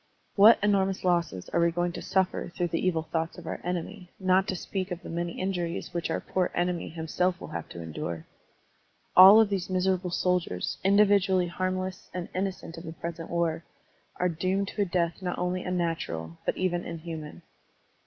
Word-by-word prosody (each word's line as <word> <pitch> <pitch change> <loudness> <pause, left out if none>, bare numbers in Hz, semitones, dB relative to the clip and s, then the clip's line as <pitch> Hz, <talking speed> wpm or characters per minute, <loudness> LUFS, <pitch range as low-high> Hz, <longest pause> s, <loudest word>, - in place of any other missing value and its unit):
What 215 +3 +8
enormous 195 -2 +2
losses 170 - 0
are - - +1
we 170 0 +4
going 175 +1 -1
to - - -7
suffer 190 -2 0
through 175 0 -2
the 165 - -1
evil 165 -3 +1
thoughts 165 0 -3
of - - -10
our - - -5
enemy, 180 +2 -4
not 190 +1 +3
to 190 - -1
speak 190 +1 -4
of 180 -1 -5
the - - -7
many 170 0 -3
injuries 180 -2 -3
which 170 -1 -2
our 160 - 0
poor 185 -1 -1
enemy 175 -1 -1
himself 170 +2 -1
will - - -8
have 85 -2 -6
to 85 - -7
endure? 80 0 -5 0.9
All 200 +4 +10
these 195 -3 -3
miserable 185 0 +1
soldiers, 175 - -1
individually 195 -2 +4
harm 185 +1 -1
less 185 0 -5
and 180 -1 -4
innocent 185 -3 -3
of - - -11
the 160 - -6
present 165 0 -6
war, 170 -1 0 0.5
are 180 - +1
doomed 185 +4 -1
to 210 - -3
a - - +3
death 170 -1 -1
not 180 -1 -3
only 180 +1 -1
unnatural, 165 - -3
but - - 0
even 175 -2 0
inhuman! 160 -1 -7
180 Hz, 185 wpm, -28 LUFS, 165-185 Hz, 0.9 s, All